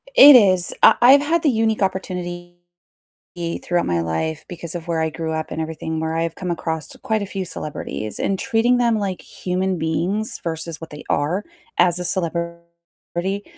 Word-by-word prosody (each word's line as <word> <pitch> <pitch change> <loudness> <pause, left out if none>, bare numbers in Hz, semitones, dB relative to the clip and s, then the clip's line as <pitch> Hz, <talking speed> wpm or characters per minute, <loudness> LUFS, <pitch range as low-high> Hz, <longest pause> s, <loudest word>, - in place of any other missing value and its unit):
It 290 - +11
is, 185 -6 +5
I - - +8
I've 265 +4 +8
had 320 +3 0
the 305 - +4
unique 220 -3 +1
opportunity 175 -2 -3 1.1
throughout 175 0 0
my 85 -1 0
life, 85 - -3
because 170 -2 -6
of 170 -1 -6
where 165 -1 0
I 160 - 0
grew 160 0 -4
up 160 0 -3
and - - -4
everything, 160 0 -4
where 160 0 -2
I've 165 0 -1
come 180 0 -5
across 160 -2 -3
quite 220 -1 -1
a - - -3
few 195 -1 -4
celebrities, 145 -10 -5
and 195 - -1
treating 240 +5 +2
them 235 -2 +2
like 195 -3 -3
human 185 +1 -2
beings, 170 +7 -1
versus 160 -1 -4
what 165 - -8
they 150 0 -10
are 170 +8 0 0.3
as 175 -1 +4
a 180 - -4
celebrity 170 +2 -4
175 Hz, 175 wpm, -21 LUFS, 160-195 Hz, 1.1 s, It